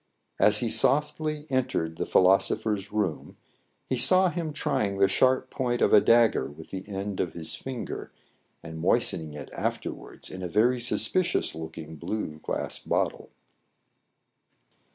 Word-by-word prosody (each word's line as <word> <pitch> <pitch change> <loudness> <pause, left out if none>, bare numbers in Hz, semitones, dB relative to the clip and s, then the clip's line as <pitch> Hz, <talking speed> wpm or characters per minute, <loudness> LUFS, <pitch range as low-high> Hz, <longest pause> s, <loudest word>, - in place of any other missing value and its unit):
As 105 0 +5
he 120 - 0
softly 150 +4 +1
entered 125 -11 -1
the - - -3
philosopher's 100 +2 +2
room, 100 -7 -3 0.5
he 130 - -1
saw 185 +9 +5
him 170 -3 -3
trying 100 -8 -1
the 100 0 +5
sharp 130 +6 +2
point 120 -2 -1
of - - +3
a 105 - +8
dagger 115 - +4
with 80 +2 -13
the 95 +1 -7
end 100 0 -4
of 90 - -1
his 80 -2 -4
finger, 130 -3 -6 0.5
and 80 0 -8
moistening 80 -1 0
it 75 - -9
afterwards - - -5
in 95 - -7
a 90 - -3
very 120 +7 +2
suspicious 170 +9 +1
looking 80 0 -8
blue 75 -3 -4
glass - - -3
bottle. - - -2
105 Hz, 140 wpm, -27 LUFS, 85-130 Hz, 0.5 s, a